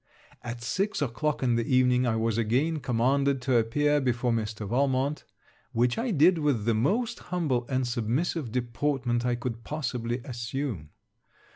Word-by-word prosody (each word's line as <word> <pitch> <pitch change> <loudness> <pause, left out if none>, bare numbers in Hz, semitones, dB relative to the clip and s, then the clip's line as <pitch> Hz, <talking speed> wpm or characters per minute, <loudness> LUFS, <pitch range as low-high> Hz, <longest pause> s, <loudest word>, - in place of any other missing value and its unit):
At 120 0 -6
six 195 - -1
o'clock 145 +2 -1
in 120 -2 +2
the 120 +3 +1
evening, 125 0 +3
I 115 - +1
was 115 -1 0
again 135 +9 +1
commanded 135 +3 +1
to 130 -2 +3
appear 145 +6 +2
before 125 -1 0
Mr. 110 -2 -2
Valmont, 135 +4 0 0.5
which 120 +1 +2
I 245 +2 -1
did 170 -1 +4
with 140 -9 +1
the 115 - +3
most 220 - 0
humble 145 -9 0
and 130 -1 0
submissive 120 +4 -1
deportment 125 0 -1
I 120 - +1
could 120 -1 -5
possibly 120 -5 -3
assume. 120 - -4
125 Hz, 150 wpm, -28 LUFS, 115-145 Hz, 0.5 s, did